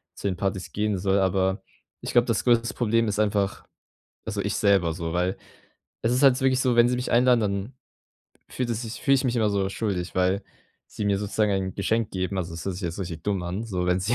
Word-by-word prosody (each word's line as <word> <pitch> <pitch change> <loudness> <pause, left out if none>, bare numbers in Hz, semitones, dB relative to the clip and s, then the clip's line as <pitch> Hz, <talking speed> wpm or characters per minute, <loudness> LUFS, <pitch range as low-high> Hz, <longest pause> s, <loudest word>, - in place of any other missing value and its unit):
zu - - -4
den 95 -3 -2
Partys 95 -1 -3
gehen 105 -1 0
soll, 95 +1 +1
aber 95 +1 +1 0.4
ich - - -4
glaube, 120 -1 +5
das 115 -4 0
größtes 115 -1 +3
Problem 115 -1 +1
ist 105 0 -1
einfach 100 -2 0 0.6
also, 100 0 -3
ich 100 0 -2
selber 95 -5 +3
so, 80 -1 -4
weil 90 +2 0 0.6
es 115 - +1
ist 130 +3 +1
halt 130 -1 +6
wirklich 130 -1 +3
so, 125 -2 +2
wenn 120 0 +5
sie 125 - +1
mich 125 - -3
einladen, 125 0 +4
dann 100 +4 -2 0.8
fühlt 125 -2 -2
es 115 +1 -2
sich 115 0 -7
fühle 135 - +3
ich 130 - -1
mich 125 -1 0
immer 110 -2 +2
so 100 -1 0
schuldig, 95 -5 -3
weil 95 +2 +1 0.4
sie 105 - -6
mir 100 -1 +2
sozusagen 105 +1 0
ein 95 -1 -2
Geschenk 110 +2 0
geben. 95 +1 -3
Also, 85 -2 -3
das 85 -1 -7
hört 95 - -1
sich 95 - -8
jetzt 85 +2 -4
richtig 85 -4 -5
dumm 100 -3 -1
an, 90 +5 -4
so 90 -5 -2
wenn 90 +1 +2
sie 105 +6 0
100 Hz, 235 wpm, -25 LUFS, 95-115 Hz, 0.8 s, halt